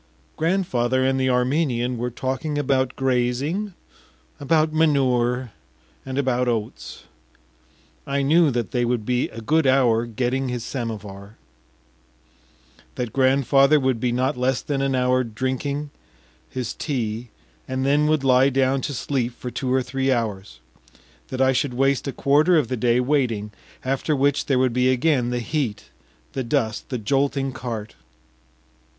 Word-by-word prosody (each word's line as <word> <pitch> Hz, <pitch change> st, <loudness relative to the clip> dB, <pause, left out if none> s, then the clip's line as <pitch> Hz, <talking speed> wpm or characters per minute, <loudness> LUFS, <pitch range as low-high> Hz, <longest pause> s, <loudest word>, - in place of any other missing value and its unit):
Grandfather 130 Hz, -8 st, +1 dB
and 135 Hz, 0 st, +1 dB
the 130 Hz, 0 st, +1 dB
Armenian 125 Hz, -1 st, +1 dB
were 120 Hz, +1 st, -2 dB
talking 130 Hz, +5 st, -3 dB
about 130 Hz, -2 st, 0 dB
grazing, 135 Hz, +10 st, -1 dB, 0.6 s
about 155 Hz, +2 st, +2 dB
manure, 130 Hz, -6 st, +2 dB, 0.5 s
and 135 Hz, 0 st, -5 dB
about 125 Hz, -2 st, +1 dB
oats.... 105 Hz, -, -4 dB, 1.0 s
I 140 Hz, 0 st, 0 dB
knew 160 Hz, +3 st, +4 dB
that 120 Hz, -3 st, -2 dB
they 125 Hz, -2 st, 0 dB
would 120 Hz, -2 st, -1 dB
be 125 Hz, +1 st, 0 dB
a 115 Hz, -, -9 dB
good 155 Hz, +5 st, +2 dB
hour 120 Hz, -3 st, +3 dB
getting 125 Hz, +3 st, -1 dB
the 125 Hz, -1 st, -3 dB
samovar; 105 Hz, -4 st, -6 dB, 1.6 s
that 120 Hz, -3 st, -4 dB
grandfather 135 Hz, +2 st, +4 dB
would 130 Hz, -3 st, 0 dB
be 125 Hz, +1 st, 0 dB
not 125 Hz, +2 st, 0 dB
less 125 Hz, 0 st, 0 dB
than 140 Hz, -2 st, -2 dB
an 135 Hz, -1 st, 0 dB
hour 125 Hz, 0 st, +2 dB
drinking 130 Hz, +5 st, -3 dB, 0.6 s
his 125 Hz, -3 st, -4 dB
tea, 120 Hz, -5 st, -3 dB, 0.4 s
and 130 Hz, 0 st, -2 dB
then 145 Hz, +2 st, +3 dB
would 155 Hz, -2 st, +1 dB
lie 130 Hz, 0 st, +5 dB
down 135 Hz, 0 st, +1 dB
to 145 Hz, -, -3 dB
sleep 125 Hz, -1 st, -2 dB
for 125 Hz, -, -7 dB
two 130 Hz, 0 st, -3 dB
or 130 Hz, 0 st, +2 dB
three 135 Hz, +1 st, -1 dB
hours; 105 Hz, -, -3 dB, 0.7 s
that 130 Hz, -, -4 dB
I 130 Hz, 0 st, +4 dB
should 130 Hz, 0 st, -1 dB
waste 135 Hz, +2 st, +1 dB
a -, -, -1 dB
quarter 150 Hz, +7 st, +3 dB
of 140 Hz, -7 st, +1 dB
the 130 Hz, -, -1 dB
day 120 Hz, 0 st, +2 dB
waiting, 125 Hz, -6 st, 0 dB, 0.3 s
after 135 Hz, +3 st, 0 dB
which 145 Hz, +1 st, +1 dB
there 135 Hz, -, +2 dB
would 130 Hz, -2 st, +2 dB
be 125 Hz, +1 st, +2 dB
again 130 Hz, -1 st, +2 dB
the 125 Hz, 0 st, -2 dB
heat, 120 Hz, -5 st, -3 dB, 0.4 s
the 130 Hz, -, -2 dB
dust, 115 Hz, -4 st, -1 dB
the 125 Hz, -, -2 dB
jolting 135 Hz, +4 st, 0 dB
cart. 115 Hz, -4 st, -6 dB
130 Hz, 150 wpm, -23 LUFS, 120-140 Hz, 1.6 s, lie